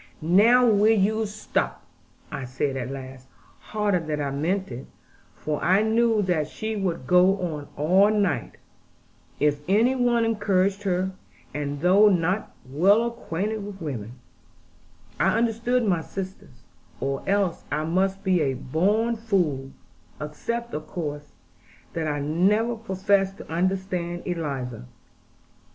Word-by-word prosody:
'Now 215 Hz, +10 st, +5 dB
will 215 Hz, 0 st, +4 dB
you 215 Hz, +3 st, +1 dB
stop?' 210 Hz, +1 st, -3 dB, 0.5 s
I -, -, -4 dB
said 135 Hz, +2 st, -2 dB
at 130 Hz, -1 st, -3 dB
last, 130 Hz, -1 st, -8 dB, 0.3 s
harder 210 Hz, -3 st, 0 dB
than 155 Hz, -2 st, -3 dB
I 140 Hz, -1 st, -2 dB
meant 170 Hz, +5 st, -1 dB
it, 125 Hz, +2 st, -7 dB, 0.5 s
for 150 Hz, -1 st, -3 dB
I 190 Hz, +4 st, +4 dB
knew 225 Hz, -1 st, +2 dB
that 170 Hz, -5 st, 0 dB
she 220 Hz, +7 st, -4 dB
would 185 Hz, -9 st, -2 dB
go 180 Hz, +5 st, +5 dB
on 155 Hz, -5 st, -4 dB
all 185 Hz, +7 st, +4 dB
night, 200 Hz, -, 0 dB, 0.8 s
if 145 Hz, 0 st, +2 dB
any 220 Hz, +7 st, +4 dB
one 240 Hz, -2 st, +2 dB
encouraged 200 Hz, -3 st, +1 dB
her: 185 Hz, 0 st, 0 dB, 0.4 s
and 145 Hz, -1 st, -3 dB
though 195 Hz, +5 st, +6 dB
not 180 Hz, +2 st, 0 dB
well 190 Hz, -, +3 dB
acquainted 215 Hz, -2 st, -3 dB
with 200 Hz, -1 st, -8 dB
women, 120 Hz, -, -5 dB, 1.1 s
I -, -, +3 dB
understood 235 Hz, +1 st, +1 dB
my 180 Hz, -5 st, +1 dB
sisters; 185 Hz, -9 st, -8 dB, 0.4 s
or 135 Hz, 0 st, -2 dB
else 195 Hz, -4 st, +1 dB
I 150 Hz, +1 st, 0 dB
must 190 Hz, +4 st, 0 dB
be 185 Hz, -3 st, +2 dB
a 135 Hz, -3 st, 0 dB
born 200 Hz, -, +1 dB
fool 180 Hz, -12 st, 0 dB, 0.5 s
except, 235 Hz, +11 st, -4 dB
of 155 Hz, -, -5 dB
course, 150 Hz, -4 st, -5 dB, 0.6 s
that 160 Hz, -1 st, -2 dB
I 145 Hz, -1 st, -1 dB
never 195 Hz, +11 st, +2 dB
professed 195 Hz, -2 st, 0 dB
to -, -, -11 dB
understand 180 Hz, 0 st, -1 dB
Eliza. 135 Hz, -, -4 dB
185 Hz, 135 wpm, -25 LUFS, 150-210 Hz, 1.1 s, though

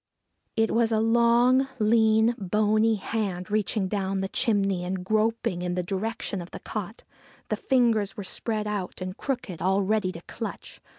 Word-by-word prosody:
It 225 Hz, 0 st, +2 dB
was 230 Hz, 0 st, +2 dB
a 220 Hz, -, +2 dB
long, 235 Hz, +3 st, +4 dB
lean, 220 Hz, +1 st, +4 dB
bony 215 Hz, +3 st, +2 dB
hand 200 Hz, -2 st, -3 dB
reaching 210 Hz, -1 st, 0 dB
down 195 Hz, -1 st, -1 dB
the 195 Hz, -, -1 dB
chimney 195 Hz, -7 st, +1 dB
and 180 Hz, 0 st, -3 dB
groping 215 Hz, -3 st, 0 dB
in 180 Hz, 0 st, -2 dB
the 180 Hz, -, -1 dB
direction 200 Hz, +1 st, -3 dB
of 175 Hz, -, -9 dB
the -, -, -8 dB
cot. 215 Hz, 0 st, -6 dB, 0.5 s
The -, -, +1 dB
fingers 230 Hz, -6 st, +2 dB
were 205 Hz, -, -4 dB
spread 215 Hz, +2 st, -3 dB
out 205 Hz, -3 st, -4 dB
and 185 Hz, 0 st, -5 dB
crooked, 240 Hz, -, -4 dB
all 190 Hz, +3 st, +2 dB
ready 210 Hz, -1 st, +1 dB
to 170 Hz, -, -9 dB
clutch. 225 Hz, +5 st, -7 dB
215 Hz, 165 wpm, -26 LUFS, 190-225 Hz, 0.5 s, long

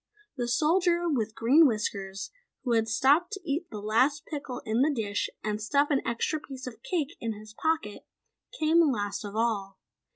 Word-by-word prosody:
The 245 Hz, -3 st, -2 dB
Soldier 340 Hz, +7 st, +2 dB
with 225 Hz, -8 st, -1 dB
Green 285 Hz, +8 st, +6 dB
Whiskers, 200 Hz, -4 st, -3 dB, 0.3 s
who 250 Hz, -, -1 dB
had 225 Hz, -1 st, +2 dB
stopped 280 Hz, -, +3 dB
to 395 Hz, -, -4 dB
eat 315 Hz, +5 st, -2 dB
the 215 Hz, -, -7 dB
last 255 Hz, +9 st, +1 dB
pickle 280 Hz, -5 st, -6 dB
in 220 Hz, +3 st, +1 dB
the 290 Hz, -, +4 dB
dish 210 Hz, -6 st, -1 dB
and 210 Hz, 0 st, -2 dB
stuff 285 Hz, +7 st, +2 dB
an 275 Hz, -, +3 dB
extra 235 Hz, +6 st, -1 dB
piece 265 Hz, -3 st, -9 dB
of 250 Hz, -3 st, -8 dB
cake 335 Hz, -4 st, -2 dB
in 230 Hz, -1 st, -2 dB
his 215 Hz, 0 st, -12 dB
pocket, 315 Hz, -7 st, -2 dB, 0.5 s
came 320 Hz, -1 st, +4 dB
last 205 Hz, -4 st, -2 dB
of 205 Hz, 0 st, -7 dB
all. 205 Hz, -4 st, -1 dB
245 Hz, 175 wpm, -28 LUFS, 215-305 Hz, 0.5 s, Green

